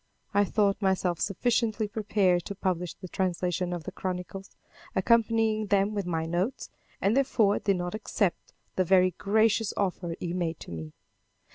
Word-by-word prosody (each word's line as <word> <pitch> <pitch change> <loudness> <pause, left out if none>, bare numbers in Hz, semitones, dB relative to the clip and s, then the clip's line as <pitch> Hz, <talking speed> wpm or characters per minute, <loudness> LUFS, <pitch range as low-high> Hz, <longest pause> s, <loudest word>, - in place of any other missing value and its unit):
I 205 0 +4
thought 200 0 +1
myself 185 -3 +1
sufficiently 220 +1 0
prepared 205 -4 +1
to 200 - -5
publish 180 -3 -2
the 185 - -9
translation 180 -1 -1
of 175 -2 -4
the - - -6
chronicles, 185 +1 -5 0.5
accompanying 225 +1 +2
them 200 +1 +2
with 200 -3 -2
my 165 -2 -1
notes, 175 +9 -2 0.3
and, 200 +4 +2
therefore, 230 -7 +3
did 200 -1 +1
not 175 0 -3
accept 210 -3 -1 0.3
the 185 - +4
very 185 0 +4
gracious 220 +1 +2
offer 180 -3 -1
he 175 -1 -3
made 170 -3 -2
to - - -9
me. 80 -2 -7
195 Hz, 155 wpm, -28 LUFS, 180-215 Hz, 0.5 s, I